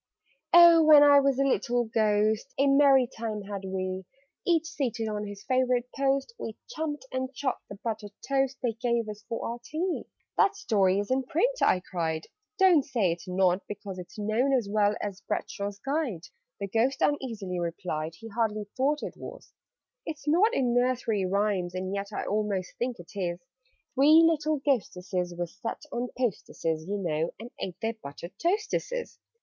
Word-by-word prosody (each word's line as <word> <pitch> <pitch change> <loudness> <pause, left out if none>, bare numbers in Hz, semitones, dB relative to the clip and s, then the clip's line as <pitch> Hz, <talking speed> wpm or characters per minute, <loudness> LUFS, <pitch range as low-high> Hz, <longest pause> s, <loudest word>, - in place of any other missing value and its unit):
"Oh, 340 -1 +9
when 305 -2 +8
I 285 -1 +8
was 275 -2 +2
a 275 - +3
little 245 -2 +1
Ghost, 215 +1 +1
A 275 - +3
merry 275 -2 +6
time 220 -3 -5
had 200 -1 -6
we! 185 0 -3 0.4
Each 330 -2 +2
seated 240 -8 -2
on 210 -1 -3
his 200 0 -9
favourite 255 0 +1
post, 275 +7 0
We 220 - -6
chumped 295 -4 -4
and 260 0 -2
chawed 265 -2 -1
the 200 - -7
buttered 215 -3 -4 0.2
toast 270 -1 +1
They 240 - +2
gave 235 0 -1
us 210 0 -7
for 230 - -3
our 235 +1 -4
tea." 340 +7 -2 0.3
"That 400 - +4
story 195 - +2
is 205 +4 -2
in 260 +1 +3
print!" 350 - +1
I 180 - +4
cried. 165 -3 -3 0.3
"Don't 370 -7 +6
say 225 -10 +1
it's 170 +2 -6
not, 185 0 +2
because 200 -2 -7
It's 180 +3 -10
known 220 +6 +1
as 230 -5 -2
well 205 0 +2
as 200 -2 -5
Bradshaw's 200 0 -4
Guide!" 270 - -2 0.4
(The 200 - -3
Ghost 230 +7 +1
uneasily 220 -11 -1
replied 165 -2 -3
He 225 +7 -10
hardly 215 -1 -1
thought 285 +3 +1
it - - -5
was). - - -10 0.5
"It's 300 -2 -7
not 360 +9 +4
in 250 - +1
Nursery 245 -5 +1
Rhymes? 195 -2 0
And 185 +1 -3
yet 200 0 -2
I - - -3
almost 205 -3 -1
think 245 0 -1
it 175 -1 -13
is 175 -3 -2 0.5
'Three 305 +5 +7
little 310 -1 +2
Ghosteses' 180 - -1
were 175 - -1
set 205 - -6
'On 245 +1 -2
posteses,' 165 -9 -2
you 205 +1 -1
know, 165 -4 -1
and 235 +2 -9
ate 180 - -5
Their 225 +1 0
'buttered 170 -3 -9
toasteses.' 430 +6 -1
225 Hz, 175 wpm, -28 LUFS, 195-275 Hz, 0.5 s, Oh